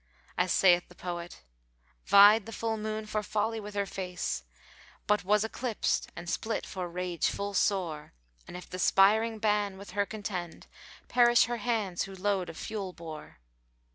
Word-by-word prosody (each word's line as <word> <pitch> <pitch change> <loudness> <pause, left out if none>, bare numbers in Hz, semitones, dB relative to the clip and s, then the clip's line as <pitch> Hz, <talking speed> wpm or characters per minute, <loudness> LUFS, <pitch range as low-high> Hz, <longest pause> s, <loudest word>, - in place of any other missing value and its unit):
As 180 0 +1
saith 180 -2 +4
the 180 - -16
poet, 175 -1 -6 0.6
"Vied 205 +2 +7
the - - -7
full 225 0 -2
moon 215 0 -4
for 215 0 -2
folly 220 +2 -1
with 210 -1 -8
her 200 0 0
face, 180 -2 -4 0.3
* - - -24
But 210 -2 +2
was 210 +3 +3
eclipsed[FN#452] 225 0 -1
and 175 - -8
split 220 +5 -2
for 180 -2 -5
rage 175 -1 -1
full 200 0 -3
sore; 180 -7 0 0.4
And 180 - -7
if 180 - -10
the 185 - -7
spiring 220 +4 +4
Bán 210 -2 +1
with 200 0 -10
her 200 +1 0
contend 190 -6 -6 0.2
* - - -19
Perish 240 -1 +5
her 240 0 -2
hands 210 -5 -1
who 195 -1 -10
load 190 -2 -1
of 165 - -9
fuel 200 -4 -5
bore!" 160 - -10
200 Hz, 170 wpm, -29 LUFS, 180-215 Hz, 0.6 s, Vied